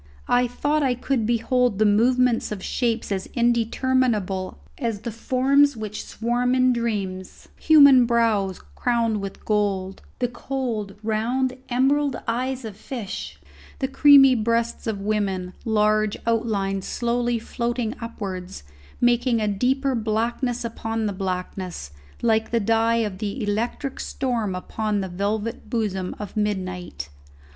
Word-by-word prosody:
I 245 0 +3
thought 290 +5 0
I 260 -3 +2
could 250 -3 -1
behold 240 -1 +1
the 215 - +3
movements 240 +3 +3
of 195 -3 -5
shapes 230 -4 -1
as 190 -1 -2
indeterminable 235 -5 +1 0.2
as 230 -6 -2
the 235 0 -4
forms 265 +4 +2
which 215 -1 -5
swarm 245 +2 0
in 255 0 +4
dreams, 200 -6 -4
human 280 -6 +7
brows 220 -5 +1
crowned 230 -3 0
with 195 -1 -7
gold, 195 -3 -1 0.2
the 245 - 0
cold 240 -5 -4
round 240 +4 0
emerald 275 +3 +2
eyes 255 +2 -2
of 215 -3 -7
fish, 220 -2 -6 0.4
the 265 - -1
creamy 275 -1 +7
breasts 230 0 0
of 215 -3 -2
women, 195 -3 -1
large 215 -1 +2
outlines 205 -4 0
slowly 240 0 0
floating 235 0 -2
upwards, 190 - -6 0.4
making 240 0 +3
a 215 - 0
deeper 260 +7 +1
blackness 235 +2 -1
upon 225 -1 -3
the 205 - -1
blackness 185 - -4 0.3
like 220 -1 +2
the 235 - +1
dye 225 +2 +2
of 190 -3 -6
the 215 +3 -3
electric 230 +6 -2
storm 230 -7 -2
upon 210 +2 -2
the 190 - -4
velvet 205 +5 -3
bosom 200 -6 -2
of 210 -2 -7
midnight. 185 - -3
230 Hz, 130 wpm, -23 LUFS, 205-245 Hz, 0.4 s, human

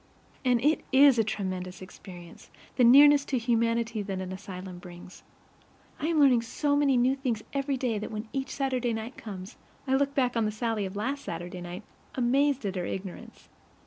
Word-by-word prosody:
And 250 -2 +3
it 305 +1 +2
IS 270 -2 +6
a - - +4
tremendous 185 -3 -4
experience, 180 -2 -12 0.3
the 250 - +3
nearness 285 +4 +7
to 265 - -1
humanity 230 -1 0
that 195 -2 -4
an 185 0 -5
asylum 185 -1 -8
brings. 180 0 -12 0.8
I 305 - -2
am 325 -2 +1
learning 260 -5 +5
so 285 +5 -1
many 280 -3 +3
new 255 +2 +3
things 245 -6 -3
every 275 -1 -1
day 240 -4 -1
that 210 - -5
when 215 +1 -6
each 270 0 -3
Saturday 255 -4 -1
night 225 +3 -5
comes 195 0 -9 0.3
I 265 - 0
look 280 +1 +1
back 250 -3 +1
on 230 -1 +1
the 215 - 0
Sallie 215 -2 -2
of 190 - -10
last 270 +7 -3
Saturday 175 +2 -6
night, 175 +3 -7 0.3
amazed 270 +1 +1
at 195 -1 -2
her 180 - -2
ignorance. 190 -2 -8
230 Hz, 185 wpm, -28 LUFS, 190-270 Hz, 0.8 s, nearness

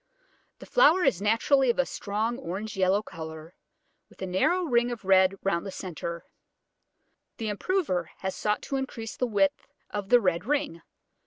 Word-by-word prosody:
The - - -12
flower 375 -8 +5
is 185 - +2
naturally 240 +5 +3
of 235 - +2
a 270 - +3
strong 220 +4 -2
orange 210 0 -5
yellow 190 +2 +2
colour, 160 -1 -9 0.6
with - - -21
a - - -1
narrow 190 - +1
ring 240 -6 +2
of 235 -5 -6
red 190 0 +5
round 170 -3 0
the 200 - -6
centre. 170 -2 -6 1.1
The 220 -2 -3
improver 245 - -1
has 190 0 -3
sought 210 0 -1
to 275 - -2
increase 235 -4 -5
the 250 - -1
width 195 -4 +1 0.2
of 205 -2 -4
the 245 - +7
red 180 -5 0
ring. 270 - -1
205 Hz, 165 wpm, -27 LUFS, 185-245 Hz, 1.1 s, the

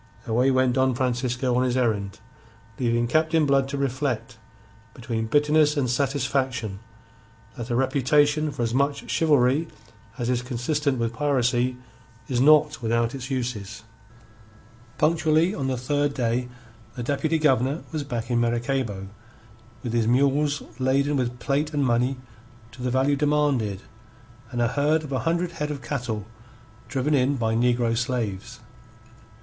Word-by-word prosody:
Away 125 +4 +2
went 130 -1 +3
Don 130 -1 +2
Francisco 125 0 0
on 125 - +2
his 130 0 +1
errand, 105 -5 0 0.6
leaving 120 -1 +1
Captain 155 +3 +2
Blood 135 -1 +2
to 140 - -3
reflect, 130 -4 -2 0.6
between 115 -2 -3
bitterness 150 +3 +3
and 135 -3 +1
satisfaction, 130 -4 -1 0.8
that 120 +1 -6
a 120 - 0
reputation 145 +4 +2
for 135 -4 -3
as 115 0 -1
much 140 +2 0
chivalry 145 0 +3 0.5
as 120 -3 -2
is 125 -1 +1
consistent 130 +3 -1
with 115 -1 -1
piracy 125 -2 +1 0.5
is 125 -2 0
not 150 0 +5
without 115 0 0
its 135 -1 -6
uses. 110 -6 -4 1.1
Punctually 160 +2 +2
on 135 -9 -3
the 130 -1 -1
third 145 +3 0
day 125 0 -1 0.5
the 125 - -4
Deputy 150 +5 0
Governor 140 -1 +1
was 155 -3 -3
back 120 -3 -4
in 120 - +2
Maracaybo 120 -4 -1 0.8
with 120 -3 -3
his 115 -2 +1
mules 140 +4 +2 0.2
laden 135 +3 +1
with 125 -2 -1
plate 150 +4 -1
and 145 -2 +2
money 125 +2 +1 0.5
to 125 - -12
the 125 - -1
value 135 +3 +2
demanded 140 -9 0 0.7
and 120 -1 -1
a 115 - +2
herd 150 +4 +1
of 150 - -8
a 130 - 0
hundred 170 +1 0
head 150 -3 -4
of 145 -3 -5
cattle 115 -7 -3 0.6
driven 135 +4 -1
in 135 0 +2
by 115 -3 0
negro 120 0 +2
slaves. 120 -2 -3
130 Hz, 145 wpm, -24 LUFS, 120-145 Hz, 1.1 s, not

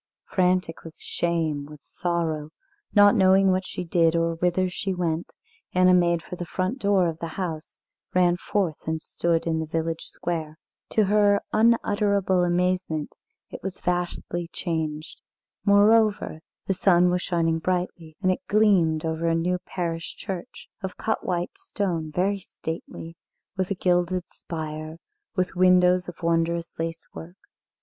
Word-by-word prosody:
Frantic 180 -3 0
with 165 -1 -11
shame, 160 -4 -1
with 150 -1 -12
sorrow, 165 -4 -2 0.5
not 205 0 +7
knowing 190 0 +5
what 185 0 0
she - - -5
did, 165 -1 +2
or 165 0 +1
whither 180 +2 +1
she 185 +1 -3
went, 170 -2 -2 0.4
Anna 185 0 +5
made 170 -2 +3
for - - -7
the 175 - -5
front 185 +9 -2
door 200 -5 +3
of 165 -1 -4
the 165 - -4
house, 165 -4 -4 0.4
ran 175 -1 +4
forth 180 -5 -2
and 160 0 -1
stood 165 +1 -1
in 160 -1 0
the 160 - -3
village 165 +1 -2
square. 160 -3 -4 0.4
To 220 - +4
her 205 0 +4
unutterable 205 -4 +3
amazement 175 -3 0 0.4
it - - -8
was 190 0 -5
vastly 175 -1 -2
changed. 160 -3 -4 0.4
Moreover, 205 -3 +4 0.3
the 195 - +1
sun 180 -2 +4
was 180 0 0
shining 165 -3 0
brightly, 175 -2 -3
and 185 - +4
it 185 - -2
gleamed 185 -7 +3
over 160 +1 -1
a 165 - +2
new 180 +2 0
parish 165 -2 -3
church, 190 -4 -7
of 190 -2 -5
cut 220 - -1
white 180 - -3
stone, 185 - -3
very 195 +5 0
stately, 165 -2 -7 0.4
with 185 -2 -1
a 200 - -1
gilded 180 0 +1
spire, 155 -1 -6 0.4
with 185 -2 0
windows 180 0 +4
of 175 0 -12
wondrous 170 0 0
lacework. 165 +2 -6
175 Hz, 145 wpm, -25 LUFS, 165-185 Hz, 0.5 s, not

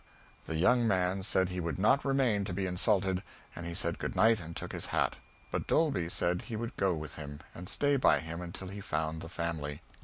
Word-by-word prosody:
The 80 - -3
young 120 +7 +4
man 95 -1 +2
said 95 -1 +2
he 90 0 -3
would 85 -1 -2
not 110 +8 +4
remain 130 -7 +2
to 95 - -3
be 95 +1 -1
insulted; 95 0 +2 0.3
and 85 0 -6
he 85 - -4
said - - 0
good - - -3
night 110 0 +5
and 85 -1 -8
took - - -5
his - - -3
hat. - - +1 0.3
But - - -2
Dolby 140 - +2
said 90 0 0
he 115 - -6
would 115 +3 -4
go 95 -3 +2
with 75 -2 -7
him, 75 -1 -7
and 90 +1 -7
stay 145 -1 +2
by 130 - +5
him 85 +2 -6
until 90 +2 -6
he 100 +1 -7
found 80 -2 -2
the 80 - -8
family. 80 -4 -3
90 Hz, 220 wpm, -32 LUFS, 85-105 Hz, 0.3 s, night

